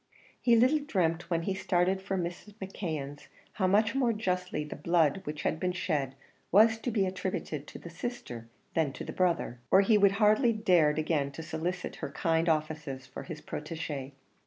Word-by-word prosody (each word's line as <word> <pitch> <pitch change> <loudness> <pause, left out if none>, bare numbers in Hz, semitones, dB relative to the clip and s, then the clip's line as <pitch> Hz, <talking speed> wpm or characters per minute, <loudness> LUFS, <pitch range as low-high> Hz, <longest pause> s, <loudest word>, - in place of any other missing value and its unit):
He 240 -2 +5
little 255 +7 +4
dreamt 175 - -1
when 165 -1 0
he 195 - -1
started 190 0 +1
for 190 0 -2
Mrs. 180 +4 -5
McKeon's, 160 -8 -5 0.3
how 185 - +1
much 210 +3 +3
more 255 -4 +2
justly 180 -6 -2
the 150 - -7
blood 165 +1 +2
which 150 0 -5
had 160 - 0
been 180 +1 0
shed 150 -8 -1 0.4
was 220 +3 +6
to 245 - -2
be 210 -4 +1
attributed 185 -5 -4
to - - -9
the 170 - -10
sister 165 - -6 0.3
than 155 -4 +1
to - - -7
the - - -6
brother, 170 -9 0
or 190 - +7
he 210 +1 +4
would 200 -1 +5
hardly 215 +4 +4
dared 175 -9 +3
again 155 -3 0
to 160 - -7
solicit 165 +3 -4
her - - -4
kind 165 +3 +1
offices 155 -4 -2
for - - -8
his 160 -4 -8
protegée. 150 -3 -5
175 Hz, 180 wpm, -30 LUFS, 155-200 Hz, 0.4 s, or